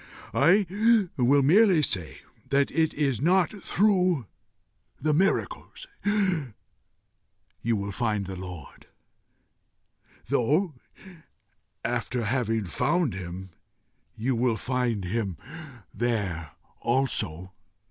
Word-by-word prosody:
I 180 - +4 0.5
will 135 +2 +3
merely 180 +1 +5
say 90 - -2 0.3
that 140 0 +2
it 160 -1 +2
is 135 -5 0
not 180 +2 +3
through 185 - +2 0.7
the 155 -1 +1
miracles 190 +6 0 1.8
you 115 0 +1
will 100 0 -3
find 105 -2 -1
the 95 0 -6
Lord, 90 -5 -9 1.4
though, 155 - +1 1.1
having 115 -2 -1
found 150 - 0
him, 95 0 -7 0.6
you 125 +4 -1
will 115 -1 +1
find 120 -5 -1
him 100 -2 -2 0.6
there 95 - -2 0.3
also. 95 -9 0
120 Hz, 85 wpm, -26 LUFS, 100-150 Hz, 1.8 s, merely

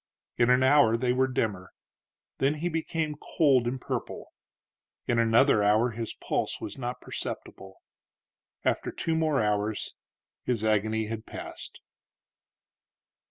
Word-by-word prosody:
In 120 0 +3
an 125 +1 +5
hour 130 -4 +5
they 125 +1 +1
were 130 +1 +2
dimmer; 105 -7 -2 0.7
then 140 +3 +2
he 165 +4 -2
became 160 -1 -2 0.2
cold 135 -6 +4
and 130 +2 -2
purple. - - -5 0.7
In 120 - +1
another 115 +1 +4
hour 110 +4 +3
his 115 0 -5
pulse - - -2
was 100 - -6
not 125 -1 -5
perceptible. 95 0 -7 0.9
After - - 0
two 165 - -2
more 155 -6 +2
hours 105 0 -1 0.5
his 120 -4 -1
agony 110 0 +1
had 110 0 -6
passed. - - -9
120 Hz, 125 wpm, -28 LUFS, 110-135 Hz, 0.9 s, an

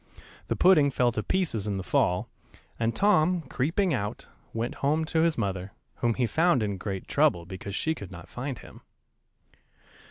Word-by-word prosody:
The - - 0
pudding 155 -6 +5
fell 125 -2 +2
to 110 - -2
pieces 115 - -1
in 100 -1 -1
the 95 - -4
fall, 90 -1 +1 0.5
and 115 0 0
Tom, 180 -4 +3
creeping 160 +7 0
out, 105 -4 -3 0.3
went 115 +2 -2
home 155 +3 +2
to 160 - 0
his 165 -1 +2
mother, 95 -3 -3 0.2
whom 120 -2 +1
he 125 - +1
found 160 -1 +2
in 100 -2 -2
great 95 -1 -5
trouble, 85 -1 +2
because 95 +2 -7
she 160 - 0
could 100 - -9
not 90 -1 -10
find 130 0 -5
him. - - -13
120 Hz, 170 wpm, -27 LUFS, 100-160 Hz, 0.5 s, pudding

